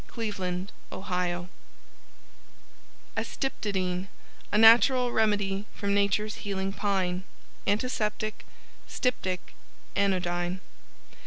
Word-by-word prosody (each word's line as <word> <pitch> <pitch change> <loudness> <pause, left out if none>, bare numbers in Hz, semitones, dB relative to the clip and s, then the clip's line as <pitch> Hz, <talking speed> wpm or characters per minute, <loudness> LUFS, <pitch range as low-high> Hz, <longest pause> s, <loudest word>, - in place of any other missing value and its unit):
Cleveland, 195 -4 -3 0.2
Ohio 180 -2 -2 1.7
ASTYPTODYNE 190 -8 -2 0.4
A - - +3
Natural 240 +3 +7
Remedy 205 -2 +1
from 200 0 -1
Natures 205 +1 +1
Healing 195 -1 -2
Pine. 190 -3 0 0.4
Antiseptic 215 0 0 0.4
Styptic 185 -8 -1 0.4
Anodyne. 180 -2 +1
200 Hz, 70 wpm, -28 LUFS, 185-215 Hz, 1.7 s, Natural